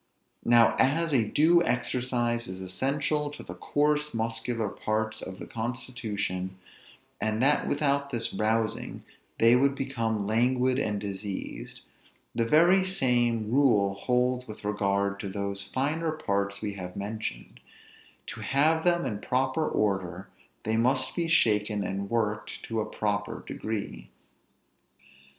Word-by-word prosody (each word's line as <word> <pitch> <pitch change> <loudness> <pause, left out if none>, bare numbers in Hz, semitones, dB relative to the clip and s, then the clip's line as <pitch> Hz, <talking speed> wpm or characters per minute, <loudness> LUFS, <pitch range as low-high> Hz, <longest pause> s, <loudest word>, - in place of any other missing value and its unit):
Now, 120 -1 +5
as 155 +4 +3
a 115 -5 +3
due 170 +3 +5
exercise 120 -2 0
is 95 0 -7
essential 140 +10 -1
to 145 - -9
the - - -8
coarse 150 -1 0
muscular 115 0 -1
parts 110 +2 -2
of 95 0 -7
the - - -8
constitution, 110 -6 -4 0.6
and 110 0 0
that 145 +2 +3
without 140 -1 +1
this 120 -4 -2
rousing 110 0 -1 0.3
they 115 +1 +6
would 135 +2 +3
become 115 -6 -2
languid 125 +4 +2
and 105 -6 -1
diseased, 100 -1 -6 0.5
the 115 - +1
very 175 +8 +5
same 120 - +1
rule 115 -8 +4
holds 125 +4 0
with 110 -1 -9
regard 100 -1 0
to 100 - -4
those 100 0 -2
finer 150 +8 -1
parts 100 -8 -2
we 105 - -2
have 90 -1 -7
mentioned; 100 - -5 0.7
to - - -8
have 160 +4 +2
them 175 -3 +2
in 105 -6 -3
proper 130 +5 0
order, 95 -3 -1 0.3
they 110 0 0
must 130 +3 +1
be 170 -2 0
shaken 105 -9 +2
and 100 +1 -3
worked 105 -2 -2
to 115 -1 -2
a - - -3
proper 105 -1 -2
degree. 100 - -5
115 Hz, 130 wpm, -28 LUFS, 105-135 Hz, 0.7 s, they